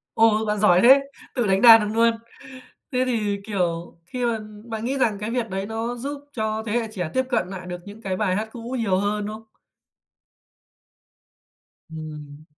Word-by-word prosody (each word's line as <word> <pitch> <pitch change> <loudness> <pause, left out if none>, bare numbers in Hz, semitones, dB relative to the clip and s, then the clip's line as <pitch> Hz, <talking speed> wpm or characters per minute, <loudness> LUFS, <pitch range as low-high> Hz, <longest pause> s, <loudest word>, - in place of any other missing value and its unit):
Ồ! 220 -1 +4
Bạn 210 0 0
giỏi 185 -3 +5
thế! 265 +3 +8 0.3
Tự 240 -4 0
đánh 195 0 +3
đàn 225 -2 +10
được 210 - -1
luôn. 230 +1 +5 0.8
Thế 255 0 +2
thì, 210 -5 0
kiểu, 175 -5 -2
khi 250 +4 -4
mà 230 -1 0 0.3
bạn 225 -1 -5
nghĩ 270 +3 -1
rằng 215 -5 +1
cái 210 +2 -3
việc 235 -3 -2
đấy 195 +1 -3
nó 225 +2 -3
giúp 280 +4 -5
cho 220 -2 -2
thế 210 - -2
hệ 235 -1 0
trẻ 180 -6 -3
tiếp 260 0 +2
cận 220 -7 0
nại 185 -2 -7
được 180 -1 -6
những 210 +2 -11
cái 190 -3 -2
bài 190 -3 0
hát 220 +1 -2
cũ 240 +2 -5
nhiều 195 -4 +1
hơn, 205 +1 -1
đúng 215 - -5
không? 225 - -15 2.5
Ừm. 150 -2 -9
215 Hz, 190 wpm, -23 LUFS, 190-230 Hz, 2.5 s, đàn